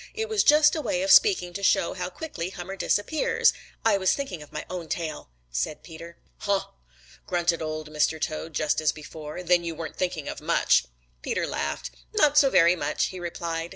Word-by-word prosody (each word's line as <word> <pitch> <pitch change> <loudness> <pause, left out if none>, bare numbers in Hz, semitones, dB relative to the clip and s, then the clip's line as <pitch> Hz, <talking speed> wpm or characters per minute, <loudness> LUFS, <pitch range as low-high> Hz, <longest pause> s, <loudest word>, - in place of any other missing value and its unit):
It 445 0 -2
was 435 -2 +2
just 300 +1 +6
a 315 - -2
way 280 -2 -1
of 290 - +2
speaking 370 - +5
to 200 - -5
show 180 -3 +2
how 180 -1 -4
quickly 185 - -5
Hummer 190 +1 -7
disappears. 205 +10 +2 0.3
I 210 -3 +4
was 190 -1 +3
thinking 270 - -4
of 150 - -13
my 150 - -5
own 175 -3 -6
tail," 160 - -4 0.2
said 65 - -3
Peter. 170 +1 -11 0.2
"Huh!" 200 -1 0 0.6
grunted 175 -2 +1
Old 155 -1 -5
Mr. 155 +1 +1
Toad 155 0 -4
just 155 0 +1
as 155 - +3
before. 155 +2 -8
"Then 175 0 +3
you 165 -1 -4
weren't 160 -1 -7
thinking 175 -5 -2
of - - -6
much." - - +3 0.4
Peter - - -1
laughed. 70 -2 -3 0.2
"Not 295 -1 +4
so 285 -2 +6
very 175 -5 +5
much," - - -1
he 185 - -8
replied. 170 -1 -4
175 Hz, 190 wpm, -26 LUFS, 155-200 Hz, 0.6 s, just